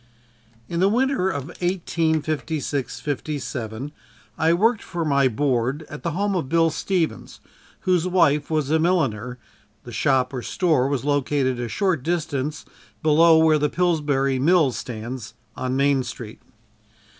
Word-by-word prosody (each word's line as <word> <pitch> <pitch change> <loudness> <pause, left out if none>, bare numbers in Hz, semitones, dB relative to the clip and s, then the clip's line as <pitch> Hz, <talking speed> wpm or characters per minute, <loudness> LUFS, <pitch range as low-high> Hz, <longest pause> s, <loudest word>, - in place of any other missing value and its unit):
In 170 - -3
the 190 +2 +4
winter 250 -3 +1
of 140 -4 -4
1856 160 -5 -1
57 140 -4 -4 0.4
I 160 +5 +2
worked 215 +6 +2
for 170 -3 -4
my 140 -2 +3
board 130 +3 0
at 145 - -7
the 170 - -2
home 200 +3 0
of 160 -8 -2
"Bill" 165 0 +3
Stevens, 170 +1 -2 0.4
whose 185 -4 +1
wife 155 -5 +2
was 155 -3 0
a 160 - +3
milliner 130 - 0 0.5
the 120 - -10
shop, 130 +2 +1
or 125 - -3
store, 155 -4 +1
was 140 -2 -2
located 140 -3 0
a 120 - -2
short 180 - 0
distance 150 -2 -2 0.4
below 160 +1 +6
where 160 -1 +4
the 150 0 +1
Pillsbury 145 -5 +1
mill 160 -1 +4
stands, 115 +1 -6 0.2
on 130 0 -2
Main 140 -1 +3
Street. 115 -3 -8
150 Hz, 140 wpm, -23 LUFS, 130-170 Hz, 0.5 s, below